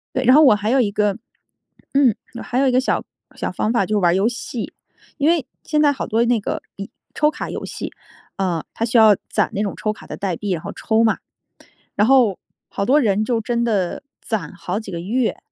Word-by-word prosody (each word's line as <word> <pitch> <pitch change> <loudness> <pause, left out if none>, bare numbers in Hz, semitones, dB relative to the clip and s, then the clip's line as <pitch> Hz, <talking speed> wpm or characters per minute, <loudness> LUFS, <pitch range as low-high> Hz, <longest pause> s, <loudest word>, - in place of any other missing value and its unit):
对， 260 - +1
然 255 +1 +6
后 305 - +8
我 240 -7 +7
还 210 +1 -2
有 265 +2 +3
一 220 - +2
个， 210 0 0 0.8
嗯 270 -6 +4 0.3
还 245 - -3
有 275 - +3
一 - - +1
个 255 - +4
小 260 - 0 0.3
小 - - -3
方 220 - -1
法 200 -5 +2
就 215 +1 0
是 - - +2
玩 175 -2 +3
儿 - - +1
游 200 +5 +2
戏， 240 -1 -5 0.5
因 290 +3 +2
为 335 -6 +2 0.2
现 300 -1 +1
在 290 -1 +5
好 270 - -4
多 230 +1 +2
那 240 -1 +2
个 205 - -3 0.5
抽 300 0 +3
卡 - - -6
游 - - -5
戏， - - -6 0.5
呃， 180 -4 -1
它 230 - -1
需 235 0 +1
要 220 -2 +8 0.2
攒 - - +1
那 205 - -1
种 205 - -2
抽 215 - -1
卡 - - -11
的 - - -6
代 185 -4 -3
币， 205 -2 -3
然 170 -3 -2
后 - - -5
抽 220 +1 +1
嘛。 220 - +2 0.8
然 210 +2 +3
后 250 -8 +4 0.3
好 200 - -3
多 275 +7 +4
人 210 -4 +2
就 235 0 0
真 235 +1 -1
的 205 -4 0 0.2
攒 195 -9 -3
好 180 +3 -3
几 205 -3 -8
个 170 - -4
月， 230 +6 0
220 Hz, 245 characters per minute, -20 LUFS, 200-255 Hz, 0.8 s, 后